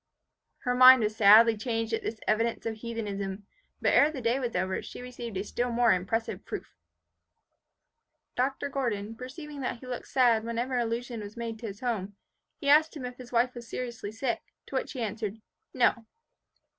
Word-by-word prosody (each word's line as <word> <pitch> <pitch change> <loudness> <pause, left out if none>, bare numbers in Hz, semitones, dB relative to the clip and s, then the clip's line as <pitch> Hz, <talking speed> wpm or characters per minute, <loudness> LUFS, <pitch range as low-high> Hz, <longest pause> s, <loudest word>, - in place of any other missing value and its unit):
Her 250 - +1
mind 255 -1 +9
was 215 0 -1
sadly 220 +2 +7
changed 225 0 -2
at 225 - 0
this 220 - -4
evidence 225 +2 +1
of 225 -1 -3
heathenism; 205 -4 -4 0.3
but - - +2
ere 290 - +6
the 290 - -6
day 240 +2 +1
was 245 -3 -3
over 185 +1 -1
she - - -9
received 240 -4 -7
a 190 - -1
still 245 +3 -2
more 235 -1 +4
impressive 200 +5 -2
proof. - - -7 1.6
Dr. 265 +3 0
Gordon 230 -6 -2
perceiving 285 +4 -8
that 250 -1 -2
he 255 - -12
looked 250 -1 -6
sad 240 -4 +3
whenever 235 +3 -2
an 245 - +2
allusion 235 +1 -4
was 210 +1 -9
made 230 -1 -5
to 230 - -5
his 200 -1 -8
home, 210 -5 -2 0.4
he 285 - -6
asked 310 +2 +5
him 260 - -6
if 250 0 -7
his 250 -1 -11
wife 245 +1 +2
was 235 -2 -10
seriously 235 -5 -5
sick, 235 +3 -2 0.2
to - - -14
which - - -2
he 255 - -5
answered, 215 0 -4 0.3
No. 240 -3 +2
235 Hz, 185 wpm, -29 LUFS, 220-250 Hz, 1.6 s, mind